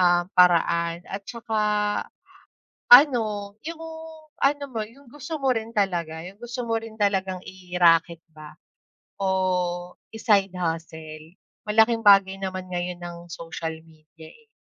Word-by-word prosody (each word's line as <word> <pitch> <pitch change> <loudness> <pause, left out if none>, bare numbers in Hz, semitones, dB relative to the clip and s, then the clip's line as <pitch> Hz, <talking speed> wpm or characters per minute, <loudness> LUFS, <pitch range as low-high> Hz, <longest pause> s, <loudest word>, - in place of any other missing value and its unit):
ah, 175 -1 +4
paraan 170 -1 +3
at 195 - -6
tsaka 230 -2 -4 1.3
ano, 220 -7 +6
'yong 325 0 -6 0.6
ano 285 +1 +2
mo, 225 -4 -4
'yong 250 +4 -18
gusto 295 +4 -7
mo 260 -3 +2
rin 225 +1 -4
talaga. 170 -6 -1
'Yong 185 +4 -10
gusto 240 0 -5
mo 225 - +1
rin 225 -1 -7
talagang 190 -2 0
i-racket 175 -2 +2 0.2
ba 155 -1 -11 0.6
o 180 -2 -1 0.2
i 220 - -8
side 200 -4 +3
hustle. 160 -1 -5 0.3
Malaking 220 +1 +3
bagay 195 -1 +6
naman 185 -1 -5
ngayon 180 0 -4
ang 175 -1 -7
social 160 -1 -6
media, 160 0 -17
eh. 455 -1 -20
190 Hz, 130 wpm, -24 LUFS, 170-225 Hz, 1.3 s, ano